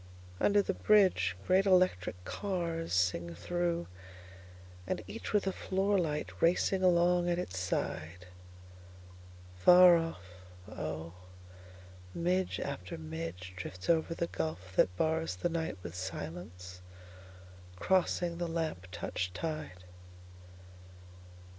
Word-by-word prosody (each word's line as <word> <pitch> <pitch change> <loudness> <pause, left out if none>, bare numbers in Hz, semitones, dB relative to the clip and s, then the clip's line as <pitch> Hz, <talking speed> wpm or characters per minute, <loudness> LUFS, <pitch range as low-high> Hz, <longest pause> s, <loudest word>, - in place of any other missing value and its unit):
Under 205 0 +4
the 195 - -1
bridgeGreat 185 - +3
electric 185 - +3
carsSing 165 - -1
through, 175 - -1 1.0
and - - -2
each 230 - -6
with 210 -2 +2
a 190 - +1
floor 195 +2 0
light 150 -3 -2
racing 180 +3 +3
along 175 -1 +3
at 175 - +1
its 95 - -4
side. 90 0 -3 1.3
Far 180 - +8
off, 165 - -4 0.4
oh, 80 -4 -5 1.0
midge 180 +2 0
after 90 -1 -5
midgeDrifts 90 - -4
over 165 0 +1
the 170 - -1
gulf 90 - -5
that 90 0 +3
barsThe 160 - 0
night 160 -10 -2
with 85 - -6
silence, 90 0 -7 0.9
crossing 175 - +1
the 175 - -1
lamp 160 - -3
touched 90 0 -4
tide. 155 - -5
160 Hz, 100 wpm, -32 LUFS, -, 1.3 s, Far